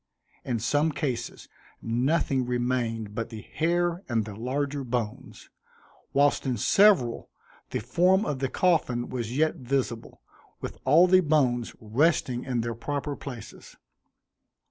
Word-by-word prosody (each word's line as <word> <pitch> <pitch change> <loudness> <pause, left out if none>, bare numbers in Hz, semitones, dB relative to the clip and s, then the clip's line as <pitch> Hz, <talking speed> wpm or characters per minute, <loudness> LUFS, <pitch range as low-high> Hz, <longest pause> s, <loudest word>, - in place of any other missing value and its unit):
In 120 -3 -1
some 145 +8 +1
cases 125 -6 -4 0.3
nothing 130 +3 0
remained 120 -3 -1
but 115 +1 -4
the 110 -3 -8
hair 175 +2 0
and 115 -3 0
the 110 - -7
larger 135 +6 -2
bones, 120 -4 -5 0.6
whilst 145 +1 +3
in 130 -3 -1
several 170 - +3 0.4
the - - -3
form 180 - +3
of 145 -3 -2
the 135 -1 -1
coffin 140 -10 +1
was 120 0 -4
yet 155 +1 +2
visible, 125 -3 -3 0.4
with - - -7
all 155 +7 +6
the 185 0 +5
bones 135 -7 +1
resting 125 +2 +1
in 125 -3 -1
their 115 0 -3
proper 145 +5 -3
places. 125 -7 -10
130 Hz, 130 wpm, -27 LUFS, 120-150 Hz, 0.6 s, all